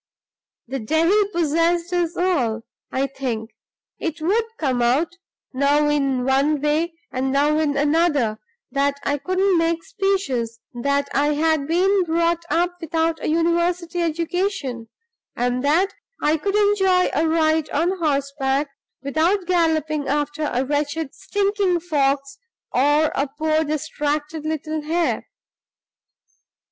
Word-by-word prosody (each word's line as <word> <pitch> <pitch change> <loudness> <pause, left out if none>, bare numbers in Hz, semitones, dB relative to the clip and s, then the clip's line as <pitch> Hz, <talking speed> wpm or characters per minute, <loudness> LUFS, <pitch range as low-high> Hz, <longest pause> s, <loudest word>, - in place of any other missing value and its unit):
The 270 +2 -3
devil 330 - +2
possessed 335 +1 +1
us 345 -1 0
all, 250 -12 0 0.3
I 265 +1 0
think. 245 -5 -4 0.5
It 330 -1 -3
would 405 +9 +1
come 260 -5 0
out, 280 +9 +1 0.4
now 285 +3 +3
in 275 -4 +1
one 275 +3 +2
way, 310 +4 0 0.2
and 265 +1 -1
now 295 +3 +2
in 295 -3 0
another, 290 -7 +2 0.3
that 280 0 0
I 285 0 0
couldn't 370 +2 +2
make 330 0 0
speeches 270 - -1
that 280 +3 0
I 290 +1 +2
had 310 -2 +1
been 375 +4 +3
brought 335 0 +1
up 350 +1 +1
without 325 0 -1
a - - 0
university 340 +2 +1
education 335 - -2 0.5
and 245 +1 -1
that 335 +7 +2 0.3
I 300 +1 +2
could 395 +6 -2
enjoy 390 -3 +3
a 315 +3 +2
ride 315 -1 +2
on 350 +6 0
horseback 280 -2 0 0.3
without 330 +7 +1
galloping 315 -4 +1
after 295 +1 -1
a 255 +2 0
wretched 290 +1 -2
stinking 400 -3 0
fox 285 0 0 0.3
or 290 +4 +3
a 280 - 0
poor 310 +3 0
distracted 305 0 -2
little 310 0 -3
hare. 330 +3 -1
310 Hz, 125 wpm, -22 LUFS, 280-340 Hz, 0.5 s, now